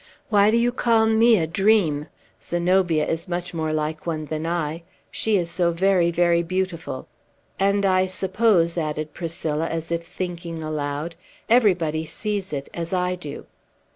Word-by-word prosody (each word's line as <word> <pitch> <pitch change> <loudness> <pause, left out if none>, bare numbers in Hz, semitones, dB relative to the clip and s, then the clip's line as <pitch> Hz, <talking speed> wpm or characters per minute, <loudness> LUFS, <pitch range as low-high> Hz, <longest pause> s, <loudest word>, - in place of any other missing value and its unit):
"Why 205 -2 +5
do 225 - +3
you 240 +1 +2
call 230 -2 +3
me 225 +1 +5
a 165 - +1
dream? 165 -4 +2 0.3
Zenobia 175 -2 +1
is 165 +3 -2
much 175 0 -4
more 160 -2 -2
like 155 +1 -3
one 155 -2 -2
than 155 +1 -4
I; 165 -1 -2 0.3
she 220 -2 +1
is 170 -2 -1
so 175 -1 +2
very, 180 0 +3
very 170 0 +3
beautiful! 185 -1 -3 0.5
And, 200 +1 +2
I 185 -1 +3
suppose," 185 -3 +2
added 155 -1 -3
Priscilla, 165 -2 -2
as 165 0 -4
if 170 0 -1
thinking 170 -2 -5
aloud, 150 +1 -3 0.4
"everybody 175 -9 +3
sees 205 -1 -3
it, 140 -2 -4
as 170 +1 -4
I 180 0 +1
do." 175 -5 -8
170 Hz, 155 wpm, -23 LUFS, 160-190 Hz, 0.5 s, Why